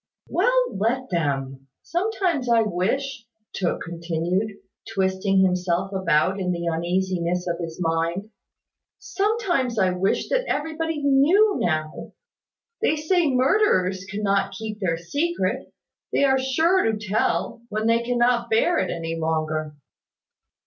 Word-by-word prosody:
"Well, - - +1
let 240 +5 -1
them. 135 -5 -2 0.2
Sometimes 350 - -1
I 230 -1 +5
wish," 230 +6 -2 0.3
continued 170 +2 -2
Tooke, 200 - -14 0.4
twisting 190 0 +2
himself 180 +1 0
about 190 0 +1
in 180 -1 -1
the 170 -1 -3
uneasiness 175 +1 -1
of 170 0 -2
his 165 -2 -5
mind, 170 +4 -1 0.7
"sometimes 390 - -1
I 190 -3 +3
wish 180 +2 0
that - - +1
everybody 320 0 -2
knew 320 +10 +4
now. 155 -2 -2 0.7
They 440 - +2
say 315 +1 +1
murderers 255 - +2
cannot 200 -1 0
keep 215 -2 -6
their 170 -5 0
secret. 290 - -2 0.4
They - - +2
are 265 -1 +4
sure 320 +8 +2
to 220 -1 0
tell, 210 +3 -1
when 215 +1 -2
they 230 +1 +3
cannot 240 0 +1
bear 280 +11 +3
it - - -1
any 165 -1 -3
longer." 155 -1 -2
210 Hz, 125 wpm, -24 LUFS, 175-275 Hz, 0.7 s, I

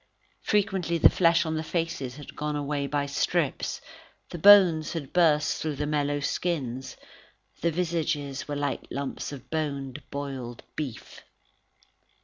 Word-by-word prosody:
Frequently, 190 -5 +1
the 160 - +7
flesh 170 -1 +3
on 160 - -2
the 155 0 -2
faces 165 -6 -3
had 145 -1 -11
gone 150 0 -2
away 145 -1 -2
by 145 0 0
strips, 140 0 -1 0.5
the 175 - -6
bones 180 -5 +7
had 145 -5 -5
burst 155 -4 +3
through 155 -2 -2
the 150 +2 -2
mellow 145 -1 0
skins, 135 -4 -2 0.6
the 170 - +2
visages 160 -5 -2
were 145 - -3
like 145 -1 -2
lumps 140 +1 -4
of 135 -4 -10
boned, 145 -3 -3
boiled 135 -4 -5
beef. 140 -7 -6
150 Hz, 135 wpm, -27 LUFS, 140-165 Hz, 0.6 s, the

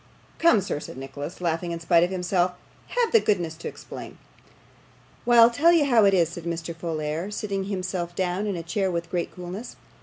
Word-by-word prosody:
'Come, 330 -11 +5
sir,' 150 - -3
said 145 - -9
Nicholas, 140 +6 -7
laughing 170 0 -1
in 170 - -3
spite 170 0 +4
of 175 - +1
himself. 180 -1 0 0.3
'Have 485 -2 0
the 455 - +7
goodness 175 - 0
to 170 - -6
explain.' - - -9 1.1
'Why, 240 0 +4
I'll 230 +1 +8
tell 320 +8 +4
you 330 -4 +4
how 235 -6 +5
it 195 - +5
is,' 170 -3 +3
said 170 0 -8
Mr. 170 0 -3
Folair, 160 +1 -3
sitting 200 -2 -3
himself 185 -3 -3
down 185 +3 -1
in 200 - -1
a 170 - -5
chair 190 +3 -1
with 170 -1 -3
great 175 -2 -2
coolness. 180 +6 -7
180 Hz, 200 wpm, -25 LUFS, 170-205 Hz, 1.1 s, I'll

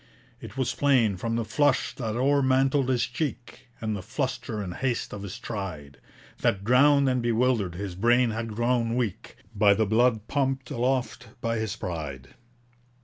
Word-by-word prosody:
It - - -10
was 130 -2 0
plain, 125 -8 +3
from 115 +5 -3
the 115 -1 -1
flush 145 +6 +1
that 115 -4 -4
o'ermantled 135 0 +2
his 125 -2 +2
cheek, 125 -1 -5
And 110 -1 -2
the 100 - -5
fluster 105 +3 -3
and 95 -4 -4
haste 125 +3 -2
of 100 - -6
his 100 -3 -6
stride, 80 -10 -6 0.4
That, 100 0 +1
drowned 140 +5 +5
and 125 -1 +1
bewildered, 115 -6 +1
his 95 0 -5
brain 120 +5 +3
had 115 -1 -4
grown 120 0 +1
weak 110 -5 -3 0.2
By 100 -1 +5
the 110 - +2
blood 110 +1 +2
pumped 135 -2 -1
aloft 125 -1 -1
by 115 -1 -1
his 110 -1 -2
pride. 75 -9 -6
115 Hz, 160 wpm, -26 LUFS, 105-130 Hz, 0.4 s, drowned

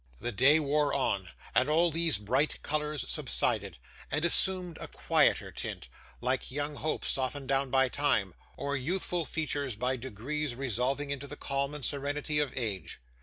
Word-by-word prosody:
The 120 - -2
day 140 +8 +5
wore 150 0 +1
on, 100 -9 0 0.2
and 130 - +3
all 165 +2 +4
these 165 0 +3
bright 130 +9 0
colours 150 -2 -1
subsided, - - 0 0.3
and 155 +4 0
assumed 180 -1 +3
a - - -5
quieter - - +2
tint, 60 - -5 0.3
like 130 +1 -1
young 145 +2 -2
hopes 155 - -2
softened 135 +1 -2
down 135 0 +1
by 130 +1 +4
time, 110 -9 +1 0.2
or 140 0 -2
youthful 175 +4 -1
features 145 -4 -2
by 125 +4 -1
degrees 130 +4 -3
resolving 135 +3 -1
into 140 0 -4
the 145 - -7
calm 140 +1 -1
and 145 -4 -3
serenity 145 +2 0
of 145 -2 0
age. 105 -8 -3
140 Hz, 160 wpm, -30 LUFS, 130-150 Hz, 0.3 s, day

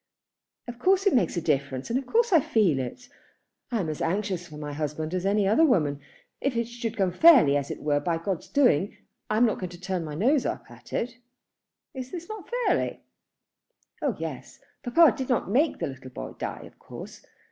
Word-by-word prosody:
"Of 240 0 -8
course 385 +7 +3
it 395 - +4
makes 240 -6 +2
a - - 0
difference, 140 - -1
and 250 - +2
of 270 - -9
course 465 - +2
I 330 - +8
feel 205 - +2
it. 130 - -6 0.6
I 235 - 0
am 170 - -3
as 155 -1 -4
anxious 185 0 -1
for 150 - -11
my 150 -1 -6
husband 155 +2 -3
as 185 +1 -1
any 200 0 +2
other 220 +11 +4
woman. 150 - +2 0.4
If 275 -3 0
it 235 -1 0
should 235 -1 -5
come 190 -3 +2
fairly, 235 - +7
as 140 -1 -1
it - - -6
were 145 -1 +2
by 165 +3 -1
God's 175 +1 -3
doing, 205 - +2 0.3
I 215 - +1
am 240 - +5
not 220 - 0
going 185 - -4
to 175 - -12
turn 185 -1 -2
up - - -5
my 150 - -6
nose 260 - +2
at - - -7
it." 235 +1 -3 0.7
"Is 260 -1 -7 0.2
not 435 0 -7
this - - -14
fairly?" - - 0 1.0
"Oh 280 -8 0
yes. 150 -5 -7 0.2
Papa 310 +7 +5
did 265 -1 -4
not 240 -6 0
make 290 +8 +2
the - - -2
little 130 -1 -8
boy - - -7
die, - - -5
of - - -15
course. - - -10
200 Hz, 210 wpm, -26 LUFS, 155-250 Hz, 1.0 s, I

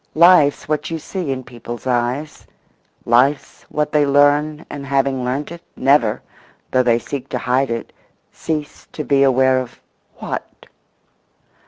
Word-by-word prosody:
Life's 165 -3 +5
what 150 0 -2
you 165 - -3
see 170 -1 -4
in 130 -1 -4
people's 120 0 -9
eyes; 125 +4 -2 0.6
life's 130 +5 +1
what 150 0 -1
they 150 -1 +3
learn, 145 +2 +2
and, 140 - -7
having 135 -1 0
learnt 135 +5 -3
it, 170 0 -9
never, 130 -5 +2 0.5
though 130 - +3
they 120 -2 +3
seek 135 +2 -6
to - - -2
hide 130 +2 0
it, 115 0 -4 0.4
cease 150 -2 -5
to 155 - -4
be 140 -1 +2
aware 130 -1 +4
of—what? 130 -2 -9
140 Hz, 140 wpm, -19 LUFS, 125-150 Hz, 0.6 s, Life's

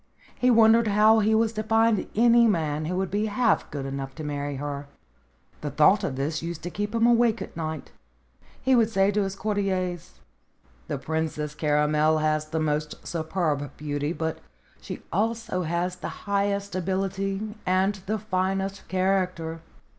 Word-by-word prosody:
He 250 - +1
wondered 225 -1 +6
how 215 +2 +5
he 220 +1 +3
was 225 0 +2
to 215 - -2
find 225 -1 +2
any 235 +1 +5
man 155 -6 0
who 180 +3 -2
would 190 0 -1
be 210 +2 0
half 230 +3 +1
good 140 -2 -5
enough 135 0 -5
to 155 - -7
marry 145 -1 -3
her. 140 0 -5 0.7
The 150 - -3
thought 190 +8 +4
of 140 -8 -2
this 145 +3 -2
used 165 -1 -5
to 175 - -4
keep 205 +4 -3
him 230 0 +3
awake 235 -1 +4
at 195 - -8
night. 160 -1 -5 0.7
He 265 - +2
would 230 -2 +4
say 195 -2 +2
to 205 +1 +1
his 195 -1 -2
courtiers: 190 -4 -2 0.7
"The - - -2
Princess 155 0 -3
Caramel 150 +1 +2
has 155 0 0
the 160 +1 -2
most 150 -1 -2
superb 160 -3 -2
beauty, 145 0 -2
but 160 -2 -3 0.4
she - - -7
also 225 -1 -1
has 175 +2 -2
the - - -8
highest 200 0 0
ability 195 +3 -2
and 190 +2 +3
the 215 +2 0
finest 195 -1 -2
character." 185 -4 -1
185 Hz, 160 wpm, -26 LUFS, 155-210 Hz, 0.7 s, wondered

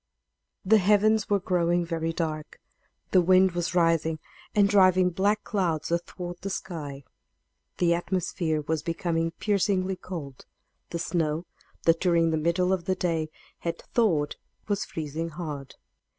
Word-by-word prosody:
The 215 +3 +6
heavens 210 +2 +3
were 205 -1 +3
growing 175 -1 +1
very 165 -1 -2
dark; 155 -2 -4 0.5
the 185 - +6
wind 185 +1 +5
was 175 0 -2
rising 165 -2 +2 0.4
and 205 -1 +5
driving 185 -2 +5
black 205 +4 +1
clouds 175 -8 -1
athwart 175 +1 -4
the 195 - -4
sky; 145 -7 -5 0.7
the 170 -1 +3
atmosphere 170 -3 -1
was 155 +1 -2
becoming 165 0 -1
piercingly 190 +1 0
cold; 165 -8 -8 0.4
the - - -3
snow, 165 -1 -1 0.4
that 165 0 +4
during 170 -2 +3
the 160 - +1
middle 175 +4 +1
of 180 -3 -2
the 185 - +1
day 165 -4 -1 0.3
had 170 0 -3 0.2
thawed, 165 -11 +2 0.3
was 205 -1 -1
freezing 160 +1 -4
hard. 150 -5 -6
170 Hz, 135 wpm, -27 LUFS, 165-185 Hz, 0.7 s, The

